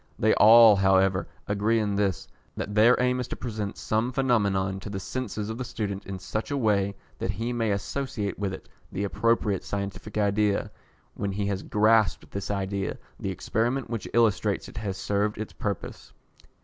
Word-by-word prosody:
They 110 - +3
all, 110 -1 +8
however, 95 -2 +3 0.2
agree 105 +3 +1
in 105 -2 0
this, 100 -3 0 0.3
that 105 - -4
their 110 +4 +5
aim 125 0 +2
is 125 - -3
to - - -4
present 105 -4 -4
some 110 +3 0
phenomenon 100 -8 +1
to 100 - -8
the 100 -1 -4
senses 105 -1 -4
of 110 - -6
the - - -2
student 105 -5 -4
in 95 -1 -4
such 100 +4 -4
a 145 - -1
way 100 -5 +1 0.2
that - - -2
he 115 +5 -2
may 115 -2 0
associate 105 0 -3
with 100 -2 -1
it 95 - -8 0.2
the 100 - -3
appropriate 105 -1 +1
scientific 100 +1 -5
idea. 105 0 +1 0.4
When 100 -1 -3
he 100 +1 -2
has 100 -1 -1
grasped 110 -3 +2
this 100 -1 -5
idea, 100 -1 -2 0.2
the - - -3
experiment 120 +3 -1
which 115 -3 -3
illustrates 110 -3 +2
it - - -11
has 100 -4 -3
served 105 +2 -1
its 110 0 -6
purpose. 100 -3 -5
105 Hz, 175 wpm, -26 LUFS, 100-115 Hz, 0.4 s, all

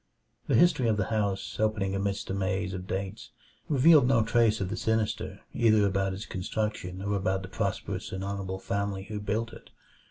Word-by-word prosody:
The - - +2
history 170 -8 +4
of 110 -2 +2
the 100 - -1
house, 100 -3 -1
opening 105 -3 +1
amidst 100 0 -2
a - - -1
maze 95 0 -1
of 90 0 -6
dates, 95 +2 -4 0.4
revealed 145 -1 +6
no 120 -4 +4
trace 115 -1 +3
of 95 -3 -2
the 105 - -2
sinister 110 -1 -1
either 110 -3 +4
about 95 -1 0
its 100 - -7
construction 95 -1 -3
or 100 +1 -1
about 95 -1 0
the - - -6
prosperous 95 - -3
and 95 0 -4
honorable 95 -1 -3
family 100 0 -2
who 105 +1 -5
built 105 +3 -2
it. - - -13
100 Hz, 185 wpm, -28 LUFS, 95-110 Hz, 0.4 s, revealed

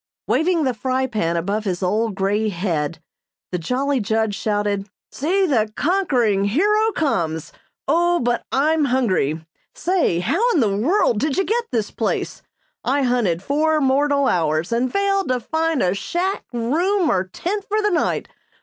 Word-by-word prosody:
Waving 335 -1 +1
the 260 -2 +1
fry 260 +3 -1
pan 190 -9 -1
above 200 +6 -1
his 185 -1 -2
old 215 +3 0
grey 205 +3 0
head, 170 -5 -2 0.5
the 180 - -2
jolly 265 - 0
judge 220 0 0
shouted: 205 -1 -1 0.2
"See, 375 +8 +1
the 225 -10 +1
conquering 255 - +1
hero 420 - +2
comes! 165 - -1 0.3
Oh, 345 +4 +3
but 240 0 0
I'm 305 +3 +2
hungry! 185 - 0 0.3
Say, 350 - +1
how 275 - 0
in - - +3
the 210 -6 +2
world 240 - +2
did 295 +4 -1
you 385 - +3
get 465 +4 0
this 225 -4 -2
place? - - -2 0.4
I 275 +3 +1
hunted 225 -9 +1
four 310 +5 +1
mortal 280 0 +2
hours 160 +1 0
and 240 +2 0
failed 395 -1 +1
to 255 -1 0
find 320 +3 0
a 180 0 +2
shack, 350 - -2
room, 320 - +1
or 185 0 +1
tent 385 - -4
for 425 +1 +1
the 420 -1 +1
night. 345 - 0
255 Hz, 160 wpm, -21 LUFS, 200-320 Hz, 0.5 s, Oh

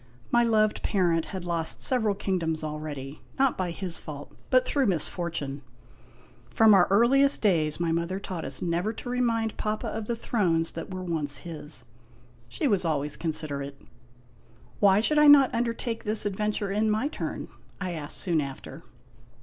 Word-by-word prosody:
My 240 0 +4
loved 215 -2 +2
parent 170 -5 +1
had 190 -3 -7
lost 170 -2 -2
several 220 -6 +2
kingdoms 170 -6 -2
already 150 -2 -6 0.2
not 270 -1 +3
by 185 -2 -2
his 175 0 -5
fault, 145 -2 -9 0.2
but 255 -1 +4
through 275 -4 +1
misfortune. 160 -5 -2 0.9
From 220 - +5
our 190 -3 +6
earliest 265 +8 +4
days 160 -7 +2
my 170 -1 0
mother 170 +3 -1
taught 185 -4 -6
us - - -3
never 175 +5 -1
to 245 - -8
remind 230 -3 0
Papa 215 0 -2
of 220 -1 -4
the 235 - -1
thrones 175 -8 0
that 165 - -7
were 185 0 -5
once 155 -5 -1
his. 160 -3 -6 0.6
She 310 - -1
was 200 -7 +2
always 150 -3 0
considerate. 140 -4 -1 0.5
" 115 +1 -28
Why 200 0 +5
should 300 +6 +2
I 300 - +6
not 280 -3 +7
undertake 230 0 -2
this 215 0 0
adventure 205 0 -1
in 215 +2 +1
my 215 +6 +1
turn? 300 - -5 0.2
' - - -30
I 185 -2 -3
asked 155 -4 -4
soon 170 -5 +1
after. 140 -2 -8
185 Hz, 165 wpm, -27 LUFS, 160-220 Hz, 0.9 s, not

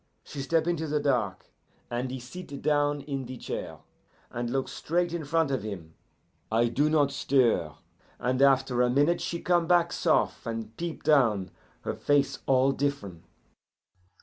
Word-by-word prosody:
She 140 - -7
step 160 +4 +1
into 170 -2 -1
the 150 0 0
dark, 125 -10 -1 0.4
and 120 +2 -2
he 130 +1 -5
sit 140 +3 -9
down 145 -1 +2
in 135 -2 -4
the 130 0 -7
chair, - - -6 0.5
and 120 0 -3
look 135 +2 -1
straight 175 +1 -1
in 170 -2 -3
front 160 0 +1
of 130 - 0
him. 90 -7 -7 0.6
I 115 +2 +3
do 145 +6 +2
not 145 -3 +3
stir, 125 - +1 0.4
and 130 +2 -1
after 135 -2 +4
a 125 - +3
minute 145 +7 +2
she 170 - -3
come 175 -2 +2
back 175 -1 +3
sof', - - +1
and 115 -1 -5
peep 170 +2 -5
down, 115 - +3 0.3
her - - -3
face 140 -2 +1
all 135 0 +4
differen'. 120 -13 -3
135 Hz, 160 wpm, -28 LUFS, 120-150 Hz, 0.6 s, after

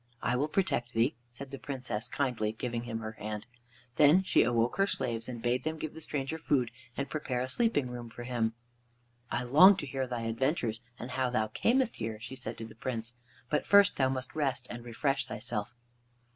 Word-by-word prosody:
"I - - +2
will 140 +4 +1
protect 150 -9 0
thee," 115 +5 +3 0.2
said 130 +3 -9
the 135 - -6
Princess 125 -5 -3
kindly, 120 -6 -1
giving 120 +1 -3
him 115 -1 -4
her 110 0 -4
hand. 105 0 -5 0.5
Then 155 +6 +7
she - - +4
awoke 120 0 +2
her 195 0 +4
slaves 115 - -1
and 120 -2 -6
bade 125 +1 +1
them 160 +1 -2
give 155 -1 -5
the 160 - -8
stranger 150 +1 -2
food 130 -6 +1 0.3
and 140 - -1
prepare 130 -5 -2
a 130 - -1
sleeping 185 - +2
room 120 -1 -6
for 120 +1 -8
him. 115 -2 -1 0.7
"I 125 - -1
long 180 +11 +8
to 150 - -3
hear 135 -1 -2
thy 120 -2 -3
adventures 115 0 0 0.2
and 125 +1 -6
how 130 0 +1
thou 110 -3 0
camest 240 - +2
here," 110 -1 -4
she 115 - -8
said 130 -1 -6
to 115 - -6
the 110 - -11
Prince, 115 0 -3 0.4
"but 150 - +1
first 200 0 +6
thou 130 -1 +3
must 130 -1 -3
rest 140 -4 -1
and 120 0 -6
refresh 135 +4 -1
thyself." 105 +1 -3
125 Hz, 200 wpm, -31 LUFS, 115-140 Hz, 0.7 s, long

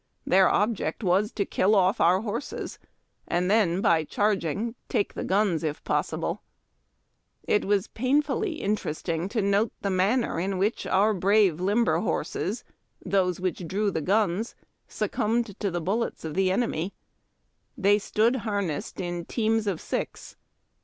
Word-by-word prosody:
Their 190 0 +5
object 205 -5 0
was 195 +3 +2
to 200 - -1
kill 200 +3 +2
off 190 0 +3
our 180 +3 +4
horses, 225 +5 -5 0.5
and 180 +2 0
then, 195 -4 +3
by 165 -4 +3
charg 205 +4 0
ing, 210 +9 -2 0.2
take 210 -5 0
the - - -4
guns, 190 -4 +1
if 155 -1 -3
possible. - - -1 1.0
It 210 - +1
was 200 0 +2
painfully 290 - 0
interesting 180 - -2
to 220 -1 -1
note 200 +3 +2
the 200 - 0
manner 195 +2 +1
in 190 +2 -1
which 205 +5 -1
our 210 +3 +3
brave 195 -3 +3
limber 205 +5 +2
horses - - -2 0.2
— - - -29
those 185 -3 +1
which 180 -1 -3
drew 200 +3 0
the 160 - -2
guns 205 +4 0 0.2
— - - -49
succumbed 225 -1 -1
to 205 - 0
the 175 -1 -2
bullets 200 +2 -2
of 155 - -4
the 190 +1 +2
enemy. 195 -4 -1 0.8
They 205 -2 +4
stood 225 +5 +1
har 205 -4 -1
nessed 155 -6 -5
in 175 -1 -3
teams 225 -2 0
of 190 -5 -1
six. - - -5
200 Hz, 155 wpm, -26 LUFS, 180-215 Hz, 1.0 s, Their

